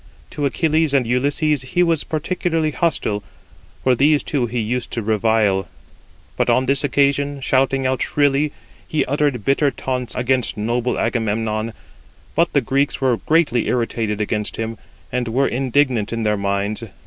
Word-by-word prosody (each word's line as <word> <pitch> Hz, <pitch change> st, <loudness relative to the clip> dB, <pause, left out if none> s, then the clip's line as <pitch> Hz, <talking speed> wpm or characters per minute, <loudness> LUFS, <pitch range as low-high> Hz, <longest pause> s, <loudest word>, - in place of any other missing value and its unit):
To 145 Hz, -1 st, -1 dB
Achilles 155 Hz, +1 st, +1 dB
and 130 Hz, -3 st, +3 dB
Ulysses 140 Hz, +4 st, +1 dB
he 175 Hz, +8 st, +1 dB
was 165 Hz, -3 st, +1 dB
particularly 160 Hz, 0 st, -1 dB
hostile, 125 Hz, -8 st, -1 dB, 0.6 s
for 130 Hz, -, +4 dB
these 145 Hz, +4 st, +3 dB
two 130 Hz, -5 st, -1 dB
he 120 Hz, +2 st, -4 dB
used 120 Hz, +2 st, -2 dB
to 115 Hz, -, -2 dB
revile. 105 Hz, -3 st, +2 dB, 0.7 s
But -, -, 0 dB
on 130 Hz, -, +3 dB
this 140 Hz, +3 st, +1 dB
occasion, 140 Hz, 0 st, +1 dB
shouting 135 Hz, 0 st, +1 dB
out 130 Hz, 0 st, 0 dB
shrilly, 145 Hz, +1 st, +2 dB, 0.4 s
he 155 Hz, -, 0 dB
uttered 140 Hz, -5 st, 0 dB
bitter 140 Hz, +1 st, +3 dB
taunts 125 Hz, -3 st, -3 dB
against 125 Hz, -1 st, 0 dB
noble 120 Hz, +3 st, -1 dB
Agamemnon; 110 Hz, -1 st, -1 dB, 0.6 s
but -, -, +2 dB
the -, -, +4 dB
Greeks 140 Hz, +1 st, 0 dB
were 130 Hz, -3 st, +2 dB
greatly 150 Hz, -7 st, +1 dB
irritated 115 Hz, -3 st, -1 dB
against 105 Hz, 0 st, -2 dB
him, 115 Hz, 0 st, -4 dB, 0.3 s
and 125 Hz, -1 st, -1 dB
were 130 Hz, +5 st, +1 dB
indignant 125 Hz, -3 st, +1 dB
in 115 Hz, -1 st, -2 dB
their 105 Hz, -1 st, +2 dB
minds. 100 Hz, +2 st, -2 dB
130 Hz, 150 wpm, -20 LUFS, 115-145 Hz, 0.7 s, for